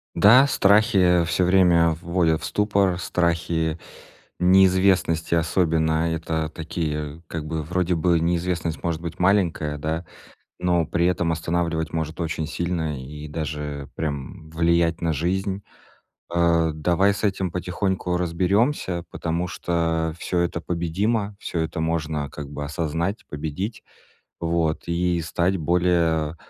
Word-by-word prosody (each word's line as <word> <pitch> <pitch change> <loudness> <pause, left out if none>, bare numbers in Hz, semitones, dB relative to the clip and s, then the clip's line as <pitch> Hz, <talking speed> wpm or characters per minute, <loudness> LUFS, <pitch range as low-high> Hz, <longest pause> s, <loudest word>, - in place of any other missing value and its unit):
Да, 125 +7 +7
страхи 95 -6 +4
всё 90 +2 +1
время 90 -3 +4
вводят 85 -2 +1
в - - -5
ступор, 100 -3 +1
страхи, 85 -2 0 0.6
неизвестности 95 -2 +3
особенно. 80 -1 +1
Это 80 -1 -2
такие, 80 -1 -4
как 80 -2 -5
бы, 80 0 -3
вроде 90 +3 0
бы, 85 +1 +2
неизвестность 85 -1 -1
может 85 -1 -2
быть 85 +1 -6
маленькая, 90 -6 +1
да, 80 +3 -3 0.6
но 90 -2 +2
при 85 +2 +1
этом 85 -2 +1
останавливать 80 -1 -1
может 80 +1 -3
очень 80 -1 -2
сильно 80 -3 -2
и 75 +3 -8
даже 75 -2 -5
прям 75 0 -5
влиять 85 0 +2
на 80 -1 +1
жизнь. 95 +5 -1 0.7
А, 85 -1 +2
давай 90 +6 +2
с 100 +2 -6
этим 95 -3 0
потихоньку 90 0 -1
разберёмся, 90 - 0
потому 85 +2 -2
что 80 -2 -1
всё 90 - -1
это 85 -1 0
победимо, 100 +6 -1
всё 85 - -4
это 80 0 -2
можно, 80 -3 -1
как 75 -2 -7
бы, 75 - -5
осознать, 80 +6 -2
победить, 80 +9 -4 0.6
вот, 85 -1 0
и 85 0 0
стать 90 +3 0
более 85 -2 +1
85 Hz, 125 wpm, -23 LUFS, 80-90 Hz, 0.7 s, Да